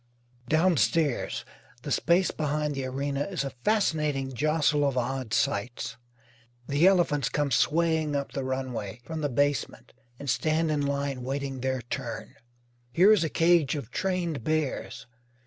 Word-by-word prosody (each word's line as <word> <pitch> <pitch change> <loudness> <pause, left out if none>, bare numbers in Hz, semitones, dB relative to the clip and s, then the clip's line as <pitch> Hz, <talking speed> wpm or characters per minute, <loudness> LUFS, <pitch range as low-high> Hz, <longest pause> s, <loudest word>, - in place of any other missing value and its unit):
Downstairs, 160 -2 +1 0.4
the - - -5
space 175 +3 +3
behind 150 -1 -1
the 135 -1 -3
arena 140 +2 -2
is 185 -7 -3
a 135 - -4
fascinating 150 -10 +1
jostle 150 +2 +2
of 140 -2 +1
odd 125 -1 -2
sights. 125 -4 -1 0.7
The 145 +6 +4
elephants 170 -8 +3
come 145 -2 -1
swaying 160 +2 +2
up 140 -1 -2
the 135 - -3
runway 125 -5 -4
from 160 -1 -5
the 145 - 0
basement 145 +3 -1 0.2
and 140 - -8
stand 155 +4 +1
in 150 -1 0
line 140 -2 -2
waiting 135 +1 -3
their 130 -1 -1
turn. 120 0 -5 0.6
Here 185 +8 +6
is 210 -6 +5
a 160 - -1
cage 165 -4 +3
of 140 -7 -6
trained 180 - -2
bears. 155 -1 -2
145 Hz, 145 wpm, -27 LUFS, 135-160 Hz, 0.7 s, Here